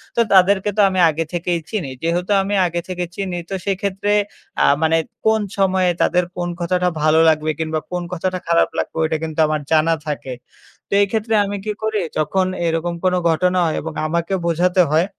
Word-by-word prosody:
তো 235 - +3
তাদেরকে 195 +2 +4
তো 210 - +5
আমি 185 -1 -1
আগে 160 +1 -1
থেকেই 175 0 -1
চিনি। 195 -11 -3
যেহেতু 175 +4 -1
আমি 200 +1 -1
আগে 170 0 -3
থেকে 180 -1 -3
চিনি 190 -3 -3
তো 195 - -3
সেক্ষেত্রে 200 +1 -1 0.5
আ - - +5 0.2
মানে 160 0 +3 0.3
কোন 220 0 +3 0.2
সময়ে 190 -2 +2
তাদের 180 0 +3
কোন 175 0 -2
কথাটা 180 +1 +1
ভালো 155 +1 +4
লাগবে? 155 0 +1
কিংবা 160 0 -1
কোন 180 0 -2
কথাটা 185 +1 -2
খারাপ 170 0 +3
লাগবে? - - -3
ঐটা 160 0 0
কিন্তু 160 0 -5
আমার 155 0 -1
জানা 160 +1 +4
থাকে 140 -3 -4 0.6
তো - - -4
এই 200 - +3
ক্ষেত্রে 225 0 -1
আমি 200 0 -4
কি 215 - -1
করি? 220 -1 0 0.2
যখন 155 +5 +1 0.2
এরকম 165 +1 -1
কোনো 180 -1 +2
ঘটনা 180 +3 +1
হয় 160 - -1
এবং 160 +1 -6
আমাকে 170 +3 -1
বোঝাতে 180 +2 +2
হয় 160 +3 +3
180 Hz, 190 wpm, -19 LUFS, 160-190 Hz, 0.6 s, তো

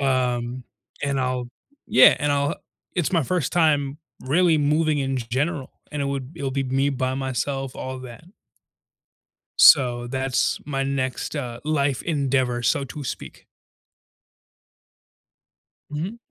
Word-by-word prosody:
Um, 125 -2 0 0.4
and 140 -1 0
I'll 125 -1 -2 0.4
yeah, 130 - +7
and 145 0 0
I'll 140 0 +1
h - - -7 0.4
it's 175 0 0
my 165 - +3
1st 170 0 -1
time 150 -4 +2 0.2
really 160 +4 +3
moving 150 +1 +2
in 135 -1 -1
g 120 -3 -4
general, 140 +2 -1 0.2
and 150 -1 -3
it - - -1
would 140 0 -4
it'll 140 -4 -3
be 135 +1 -1
me 135 +2 +1
by 130 -1 -1
myself, 135 0 -3
all 130 0 -5
that. 125 +3 -11 1.3
So 120 -4 +6
that's 130 0 0
my 135 -2 -2
next, 135 +1 -2
uh, 120 -4 -5
life 145 -3 0
endeavor, 135 -6 0
so 135 - +1
to 145 +2 -8
speak. - - -7 2.5
Mhm. 165 +9 -4
135 Hz, 135 wpm, -23 LUFS, 130-145 Hz, 2.5 s, yeah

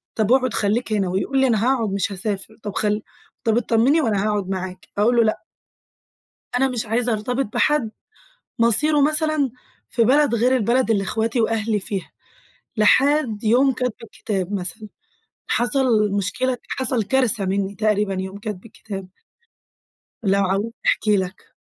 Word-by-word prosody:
طَب 220 +1 +1
أقعُد 255 -4 +3
خلّيك 215 +2 0
هنا." 195 -3 0
ويقول 230 +9 0
لي: 265 - +4
"أنا 225 -3 +1
هاقعُد 250 -5 +1
مش 200 +1 -1
هاسافر. 200 +2 -4
طَب 205 -2 -5
خل 210 0 0 0.4
طَب 225 0 +2
اتطمّني 240 +7 +3
وأنا 210 -6 0
هاقعُد 205 -3 -1
معاكِ." 185 -1 -5
أقول 230 +4 +3
له: 230 - +6
"لأ." 215 - -1 1.1
أنا 270 +1 +3
مش 240 -3 -3
عايزة 235 +2 0
أرتبط 245 +5 -1
بحَد 265 -8 +1 0.7
مصيره 290 +7 +3
مثلًا 305 -1 +2 0.4
في 230 - +2
بلد 280 +1 +3
غير 250 +3 +3
البلد 240 +1 +1
اللي 200 -3 +2
إخواتي 225 +4 -1
وأهلي 220 -2 0
فيها. 190 -1 -5 0.7
لحد 250 0 +3
يوم 255 +5 +4
كَتْب 250 -1 -2
الكتاب 205 -3 -4
مثلًا، 205 +3 -4 0.6
حصَل 240 -4 +2
مشكلة، 240 +6 -1
حصَل 255 -3 0
كارثة 230 -4 +1
مِنّي 195 +1 -1
تقريبًا 210 -1 +1
يوم 190 +1 -5
كَتْب 210 -2 -6
الكتاب. 200 -4 -8 1.2
لو 195 0 +2
عاوزني 200 +4 -1
أحكي 210 -2 +2
لك. 185 +1 -5
220 Hz, 145 wpm, -21 LUFS, 200-250 Hz, 1.2 s, له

